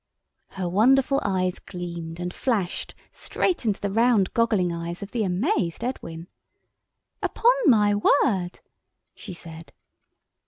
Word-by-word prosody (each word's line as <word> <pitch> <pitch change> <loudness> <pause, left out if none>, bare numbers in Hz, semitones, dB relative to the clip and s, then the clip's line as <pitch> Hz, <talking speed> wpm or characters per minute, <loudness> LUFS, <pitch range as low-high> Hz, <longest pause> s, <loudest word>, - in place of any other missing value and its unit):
Her 185 -2 -2
wonderful 265 +9 +3
eyes 185 -2 -1
gleamed 170 -2 -7
and 180 0 -4
flashed 210 -9 -2 0.2
straight 350 -9 -2
into 205 - 0
the 200 - -2
round 225 -3 +3
goggling 215 -7 +2
eyes 170 +3 -5
of 200 - -9
the 235 -3 -1
amazed 180 0 -1
Edwin. 170 -9 -5 0.9
"Upon 480 +2 +3
my 210 -5 +5
word!" 205 -4 +1 0.5
she 195 - -9
said. 165 -1 -11
195 Hz, 120 wpm, -25 LUFS, 175-230 Hz, 0.9 s, my